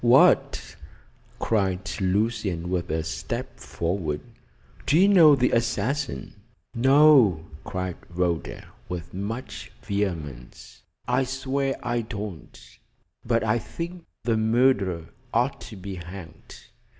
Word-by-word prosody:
"What!" 120 +2 +4 0.6
cried 95 -4 0 0.2
Lucian, 95 -3 0
with 90 -1 -1
a 80 +1 -1
step 80 0 -5
forward. 85 -3 -2 0.7
"Do 150 - +4
you 190 +3 +6
know 165 -7 +8
the 125 -2 +2
assassin?" 120 +4 -1 0.4
"No!" 130 - +5 0.2
cried 90 -1 -4
Rhoda, 85 -2 -2 0.2
with 85 -1 -6
much 110 +2 -5
vehemence. 85 - -4 0.3
"I 125 +2 +2
swear 135 +1 -1
I 120 -1 0
don't, 105 -6 -8 0.4
but 115 -1 +1
I 110 +1 +2
think 170 +7 -7 0.2
the 115 -1 +1
murderer 110 -7 +2 0.3
ought 125 +4 +1
to 110 - -9
be 95 0 -7
hanged. 90 -1 -10
105 Hz, 110 wpm, -25 LUFS, 90-125 Hz, 0.7 s, know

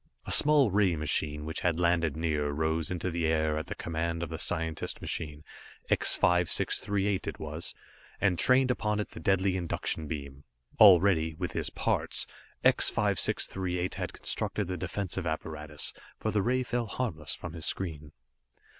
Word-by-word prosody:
A - - -5
small 145 -6 +5
ray 95 -3 +3
machine, 75 -1 -1
which 80 - -3
had 85 -2 0
landed 85 -3 +1
near, 75 -3 0
rose 80 +2 -1
into 90 0 -2
the 85 -1 0
air 80 -1 +1
at 80 - -4
the - - -5
command 85 +1 -3
of 85 - -5
the - - -5
scientist 80 -1 -1
machine, 75 -2 -4 0.5
X - - +3
5638 95 +3 +2
it - - -4
was, 75 +2 -4 0.4
and 90 -4 +1
trained 130 0 +5
upon 105 -3 -1
it 105 - -3
the - - -10
deadly 95 +2 +1
induction 85 -3 -1
beam. 70 -2 -7 0.4
Already, 90 -6 +6
with 90 +1 -4
his - - -2
parts, - - 0 0.4
X - - +5
5638 90 -1 0
had - - -4
constructed 105 - -2
the 90 +1 -4
defensive 95 0 -3
apparatus, 75 -2 -3 0.2
for - - -2
the 105 - +1
ray 130 +5 +1
fell 120 -1 -2
harmless 85 - -3
from 85 - -8
his 80 -3 -5
screen. 80 -6 -3
85 Hz, 160 wpm, -29 LUFS, 80-95 Hz, 0.5 s, Already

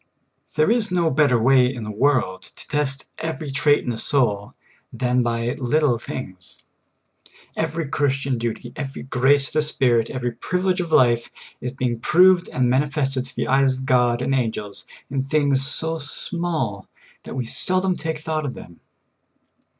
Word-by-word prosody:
There 155 +7 +3
is 230 -2 +3
no 170 -3 +1
better 135 -4 +3
way 125 +1 +4
in 120 -4 -6
the 105 - -5
world 105 -6 +1
to - - -12
test 140 -2 -2
every 160 -2 -4
trait 145 +1 +3
in 125 - -1
a 110 - -4
soul 105 -7 0 0.4
than 125 0 +1
b}^ 120 +3 -2
little 135 -1 +2
things. 95 -7 -7 0.9
Every 160 -1 -2
Christian 135 -3 0
duty, 115 -1 -4
every 135 -2 -6
grace 135 +2 +3
of - - -16
the 155 - +3
Spirit, 125 -6 +2
every 125 -1 -3
privilege 180 +9 -1
of 170 -2 -5
life, 120 -5 +3 0.3
is 125 0 -4
being 125 -3 -2
proved 180 +6 +4
and 125 -1 +1
manifested 135 0 0
to 130 - -14
the - - -1
eyes 135 0 +3
of 130 +1 -6
God 125 -1 +2
and 135 - 0
angels 110 -5 -2 0.3
in 135 -1 -1
things 140 -1 +2
vSO 160 +4 -3
small 145 - -4 0.3
that - - -8
we 130 -2 -2
seldom 185 +8 +1
take 160 -2 -3
thought 155 -1 -3
of 130 - -5
them. 85 - -12
135 Hz, 165 wpm, -22 LUFS, 120-155 Hz, 0.9 s, way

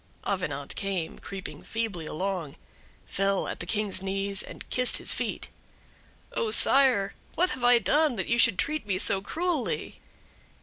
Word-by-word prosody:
Avenant 150 -8 -3
came, 190 -5 -3
creeping 195 -1 -8
feebly 215 -8 -4
along, 180 -4 -4 0.5
fell 195 0 0
at - - -5
the 175 - -5
King's 205 -2 -1
knees, 195 0 -1
and - - -8
kissed 250 0 +4
his - - +2
feet: - - -4 0.8
"Oh 460 - -1
sire, 265 - +5 0.2
what 360 +2 +2
have 260 -1 -5
I 245 0 +7
done 280 - +2
that 190 - -3
you 235 - 0
should 230 -5 +5
treat 305 -7 -2
me 195 -2 0
so 190 0 +4
cruelly?" 325 - -3
200 Hz, 150 wpm, -27 LUFS, 190-250 Hz, 0.8 s, I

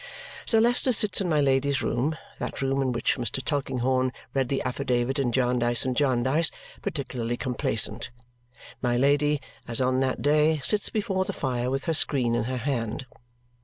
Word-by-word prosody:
Sir 225 - +5
Leicester 245 +3 +3
sits 210 -3 +2
in 185 - -1
my 155 -2 +3
Lady's 140 0 +2
room 140 +7 0 0.2
that - - -4
room 135 +1 +1
in 130 -1 +1
which 120 +2 0
Mr. 120 0 -2
Tulkinghorn 130 -2 0 0.2
read 135 -2 0
the 135 - -1
affidavit 125 0 -1
in 130 -3 +1
Jarndyce 120 -1 +2
and 130 -1 -1
Jarndyce 135 +4 +2 0.3
particularly 120 -5 -3
complacent. 115 -3 -1 0.7
My 120 -1 +1
Lady, 145 +2 +3 0.3
as 115 -1 -3
on 130 0 +2
that 130 -1 -1
day, 150 +2 +3
sits 210 +7 +1
before 195 -3 -1
the - - -3
fire 125 -2 -2
with 135 +1 -2
her 165 - +1
screen 130 -6 +2
in 120 -1 0
her 130 +1 -2
hand. 120 -2 -2
130 Hz, 165 wpm, -26 LUFS, 125-145 Hz, 0.7 s, Sir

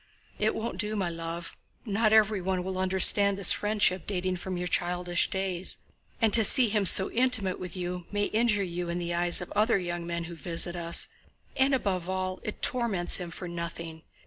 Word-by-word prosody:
"It 215 +1 0
won't 220 -5 -5
do, 210 +1 -1
my 190 -4 -2
love! 165 0 -7 0.3
Not 215 0 +1
everyone 195 -4 +2
will 185 0 -5
understand 190 +1 +4
this 195 -3 +7
friendship 205 -4 +1
dating 185 -2 -2
from 185 +1 -6
your 180 0 -3
childish 175 0 0
days, 190 -2 -1 0.4
and 225 -3 +2
to 225 - +8
see 245 +2 +4
him 205 -2 +1
so 190 +2 +7
intimate 230 -6 +1
with 180 0 -8
you 180 -1 -5
may 205 0 -1
injure 215 -2 0
you 175 -1 -5
in 170 - -3
the 175 -1 -4
eyes 175 0 +3
of 180 - -8
other 215 +2 +2
young 175 -2 -5
men 170 0 -4
who 170 +1 -9
visit 170 +2 -1
us, 170 -1 -1 0.5
and 265 +1 +2
above 185 -7 -3
all 185 0 -3
it 215 - -8
torments 225 -8 0
him 180 -2 -6
for 175 +2 -8
nothing. 170 -1 -6
185 Hz, 190 wpm, -27 LUFS, 175-205 Hz, 0.5 s, to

